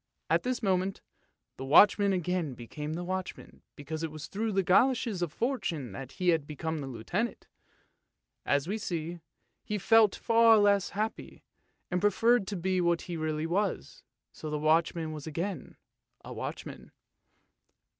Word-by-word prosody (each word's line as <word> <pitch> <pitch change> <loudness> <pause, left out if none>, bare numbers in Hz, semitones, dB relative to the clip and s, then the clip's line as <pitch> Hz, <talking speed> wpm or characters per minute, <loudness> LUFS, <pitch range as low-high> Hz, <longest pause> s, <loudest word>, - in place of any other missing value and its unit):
" - - -52
At - - +4
this 250 -1 -2
moment 190 -1 0 0.6
the 130 - -6
watchman 200 +8 +6
again 180 -6 -1
became 150 +7 -6
a 175 - -4
watchman 185 +1 -6
because 155 +2 -6
it 165 - -2
was 155 0 -8
through 220 +2 -3
the 195 -1 +1
goloshes 225 +1 +2
of 175 -4 -1
Fortune 170 - -2
that 125 +7 -8
he 180 -2 0
had 160 -4 +2
become 155 0 -4
a - - -6
Lieutenant. 135 - -3 1.0
As 140 +2 +1
we 210 +4 -2
see, 170 -3 -4 0.4
he 210 - -3
felt 215 +1 +5
far 230 -1 +5
less 205 -2 +3
happy, 215 +1 -4 0.5
and 180 0 0
pre 205 - +5
ferred 230 +1 +2
to 205 - -3
be 185 +1 0
what 170 -1 +1
he 175 - -5
really 155 -1 -2
was, 190 +4 -2 0.3
so 155 - -7
the 150 - -2
watchman 160 +1 +1
was 155 -1 -7
again 170 +1 -4 0.5
a - - -7
watchman. - - -7
175 Hz, 160 wpm, -29 LUFS, 155-205 Hz, 1.0 s, watchman